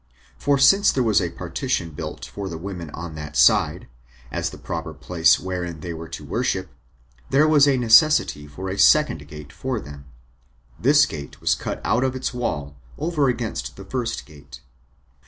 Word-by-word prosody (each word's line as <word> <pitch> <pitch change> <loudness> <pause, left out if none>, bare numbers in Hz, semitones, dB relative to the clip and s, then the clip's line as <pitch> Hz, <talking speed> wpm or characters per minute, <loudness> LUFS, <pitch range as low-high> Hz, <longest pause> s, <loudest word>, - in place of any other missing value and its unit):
For 145 -1 +1
since 195 +9 +5
there 130 - 0
was 110 -4 +3
a 85 - -1
partition 85 0 -3
built 75 - -7
for 100 -1 -6
the 85 - -6
women 90 -2 -7
on 85 +2 -7
that 75 -1 -7
side, - - +3 0.4
as - - -2
the - - -11
proper - - -5
place 85 -2 +3
wherein 90 -3 -5
they 85 +1 -5
were 80 0 -8
to - - -8
worship, - - -2 0.6
there 150 +3 +4
was 150 -2 +5
a 135 -2 +3
necessity 115 - +4
for 75 +6 -7
a 95 +1 -4
second 100 - +4
gate 75 +1 -11
for 130 -3 -3
them: 70 -5 -11 0.7
this 145 +4 +5
gate 75 -3 -8
was - - +2
cut - - -4
out 120 +3 +1
of 130 -1 -1
its 130 -1 -3
wall, 75 - -3 0.2
over 155 -5 0
against 110 - -3
the 95 - -11
first 120 +2 -3
gate. 70 -2 -14
95 Hz, 175 wpm, -23 LUFS, -, 0.7 s, since